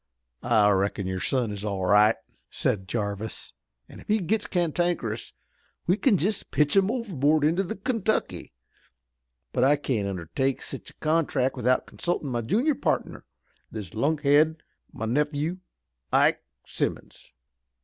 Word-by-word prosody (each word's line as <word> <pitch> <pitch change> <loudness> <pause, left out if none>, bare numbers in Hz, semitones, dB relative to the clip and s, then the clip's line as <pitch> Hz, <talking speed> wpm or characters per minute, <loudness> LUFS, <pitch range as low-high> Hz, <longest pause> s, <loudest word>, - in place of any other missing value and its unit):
"I 105 -1 +4
reckon 100 0 0
your 95 0 -2
son 125 +1 0
is 100 -1 -6
all 100 -3 -2
right," 105 +3 +5 0.3
said 95 -2 -1
Jarvis, 105 0 -3 0.3
"an' - - -12
if - - -15
he 215 - +3
gits 210 +2 -1
cantankerous 170 - -1 0.5
we 180 - +3
kin 220 -1 +3
just 195 +5 -2
pitch 150 +2 +2
him 195 0 +4
overboard 160 - +1
into 165 +5 +3
the 190 - -4
Kentucky. 220 0 -1 1.0
But 125 - +2
I 140 +3 +5
can't 125 -8 -1
undertake 100 - -2
sich - - -7
a - - -17
contract 155 -5 +1
without 125 0 +1
consultin' 170 -5 -3
my 120 -2 -1
junior 235 - +2
partner, 275 - -2 0.4
this 105 -4 -7
lunkhead, 150 +4 +2 0.3
my 110 - -5
nephew, 150 +7 0 0.5
Ike - - +4 0.2
Simmons. - - -4
145 Hz, 140 wpm, -26 LUFS, 110-175 Hz, 1.0 s, right